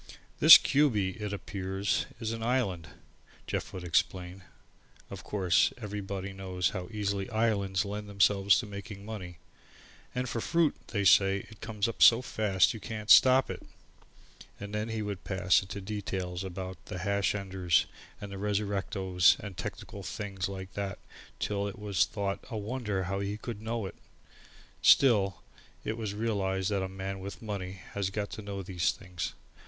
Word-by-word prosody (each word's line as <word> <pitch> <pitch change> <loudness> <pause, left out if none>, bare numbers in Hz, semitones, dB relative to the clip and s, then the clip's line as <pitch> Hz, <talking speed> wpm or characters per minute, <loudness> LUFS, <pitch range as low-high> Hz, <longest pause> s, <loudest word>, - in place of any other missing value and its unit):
"This - - +12
Cubey, 110 -10 +1
it 105 -1 -3
appears 95 +1 -2
is 110 -1 -2
an 115 0 -4
island," 110 -9 0 0.6
Jeff - - -3
would 95 - -7
explain. 90 +2 0 0.7
Of - - -7
course, 90 -5 +2
everybody 100 -3 -5
knows 95 -2 -1
how 95 -1 -5
easily 100 -3 -2
islands 105 -4 +1
lend 105 +1 -5
themselves 100 0 +4
to 120 - -2
making 100 0 -8
money, 95 -6 -7 0.8
"and 125 0 -1
for 115 -1 -3
fruit, 165 +1 +2
they 100 -3 -1
say 95 +1 +5
it 110 - -15
comes 110 -1 -1
up 115 - -6
so 120 +2 +8
fast 105 -5 +2
you 110 - -7
can't 110 -1 -3
stop 130 +1 +7
it." - - -7 1.0
And 100 +1 -7
then 105 +1 -2
he 110 -1 -2
would 100 -3 -5
pass 95 -1 +2
into 100 +1 -7
details 95 -3 -4
about 95 -3 -6
the 95 - -5
Hash 100 +2 0
enders 95 -4 +1 0.3
and 100 -1 -7
the 100 - -6
resurrectos 100 -3 +2
and 100 -3 -7
technical 100 - -6
things 95 +1 -4
like 95 -1 -7
that 100 -1 -3 0.4
till 100 -1 -1
it 100 - -7
was 100 -4 +1
thought 100 -2 -3
a 115 - -4
wonder 105 -3 -2
how 95 +2 -2
he 100 +1 -3
could 110 -1 -7
know 110 -1 -3
it. 95 - -6 0.9
Still, 100 -8 +5 0.4
it 110 - -2
was 110 -3 -4
realized 100 -3 -1
that 100 -2 +1
a 95 - -3
man 95 0 -5
with 100 +1 -7
money 95 -3 -5
has 100 -2 -1
got 100 +1 -4
to 110 - -6
know 100 -1 -5
these 90 -2 0
things. 90 -2 -6
100 Hz, 165 wpm, -30 LUFS, 95-105 Hz, 1.0 s, This